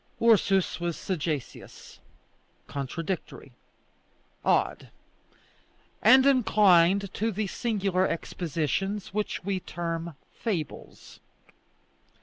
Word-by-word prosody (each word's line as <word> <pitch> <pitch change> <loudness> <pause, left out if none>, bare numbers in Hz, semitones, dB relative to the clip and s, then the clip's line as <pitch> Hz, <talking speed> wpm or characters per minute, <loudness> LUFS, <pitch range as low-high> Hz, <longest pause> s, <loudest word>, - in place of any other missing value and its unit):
Ursus 200 -6 +3
was 170 -1 -2
sagacious, 155 -6 -5 0.7
contradictory, 165 +6 -5 0.9
odd, - - +1 1.1
and 260 0 +7
inclined 200 -7 +4
to 225 +2 -1
the 215 +1 -2
singular 195 -3 0
expositions 170 +4 -3
which 210 -2 -2
we 195 0 -1
term 170 -2 -5 0.2
fables. 180 - -5
190 Hz, 75 wpm, -27 LUFS, 170-210 Hz, 1.1 s, and